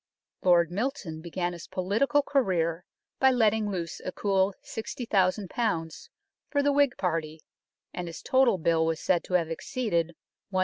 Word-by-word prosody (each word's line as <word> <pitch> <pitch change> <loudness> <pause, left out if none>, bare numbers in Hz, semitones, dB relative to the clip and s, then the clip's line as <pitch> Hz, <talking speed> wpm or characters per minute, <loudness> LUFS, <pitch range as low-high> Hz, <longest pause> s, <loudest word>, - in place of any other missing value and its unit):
Lord 175 -2 +4
Milton 195 - -3
began 175 +1 -3
his 170 - -9
political 225 +11 +1
career 180 - 0 0.3
by 265 - +6
letting 220 -4 +2
loose 175 -4 -4
a 185 - -3
cool 195 -1 +1
60,000 210 -4 -1 1.0
for 285 -1 +1
the 285 - +3
Whig 285 -3 +3
party, 160 -3 -2 0.5
and 180 -1 -4
his 165 - -8
total 260 -6 +4
bill 165 -1 +2
was 165 -1 -1
said 180 -2 +1
to 180 - -1
have 165 -2 +1
exceeded 170 -3 -1 0.3
100,000. 195 - -9
185 Hz, 145 wpm, -28 LUFS, 170-230 Hz, 1.0 s, by